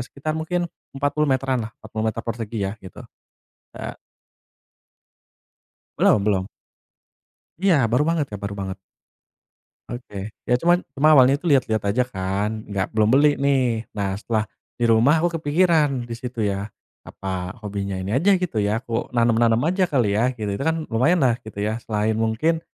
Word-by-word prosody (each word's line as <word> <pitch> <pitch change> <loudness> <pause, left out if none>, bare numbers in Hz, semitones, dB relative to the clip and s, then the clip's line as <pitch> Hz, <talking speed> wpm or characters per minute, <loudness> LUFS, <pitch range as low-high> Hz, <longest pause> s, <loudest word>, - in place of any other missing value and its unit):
sekitar 140 +5 -5
mungkin 175 +2 -1 0.3
40 145 +1 0
meteran 130 -1 +1
lah, 110 - -7
40 110 0 -5
meter 115 +1 -6
persegi 115 -1 -4
ya 95 - -3
gitu. 95 - -12 0.8
Eee - - -6 2.0
Belum 105 - +4
belum. 95 -1 +1 1.1
Iya, 190 -1 +3 0.2
baru 125 +5 +3
banget, 165 -4 +1
Kak, 105 - -6
baru 100 0 -4
banget. 95 0 -5 1.1
Oke, 105 -4 -7
ya - - -1
cuman 175 +2 +3
cuma 150 +2 +5
awalnya 135 +3 +5
tuh 175 - -2
lial-liat 120 -7 +3
aja 125 +5 +2
kan, 105 0 -2
nggak 100 0 -2
belum 110 -1 +3
beli 145 +3 +4
nih. 130 -5 +1
Nah, 100 -1 -1
setelah 110 -2 0 0.3
di 120 - -1
rumah 115 +7 +5
aku 165 0 0
kepikiran 150 -5 +2
di 120 - -8
situ 120 -1 -4
ya, 100 0 -2 0.4
"Apa 95 -1 -5
hobinya 100 -1 -3
ini 95 +3 -4
aja?" 190 +10 +4
gitu 175 - -2
ya, 105 +4 0
"Aku 115 0 -2
nanam-nanam 115 -1 +3
aja 185 +2 +1
kali 120 - +1
ya?" 115 +4 +2
gitu, 105 -3 -3
itu 100 - -4
kan 160 +2 0
lumayanlah 130 0 +3
gitu 100 -1 -6
ya, 110 +2 -2
selain 110 0 -1
mungkin 135 +10 +1
120 Hz, 160 wpm, -23 LUFS, 105-145 Hz, 2.0 s, cuma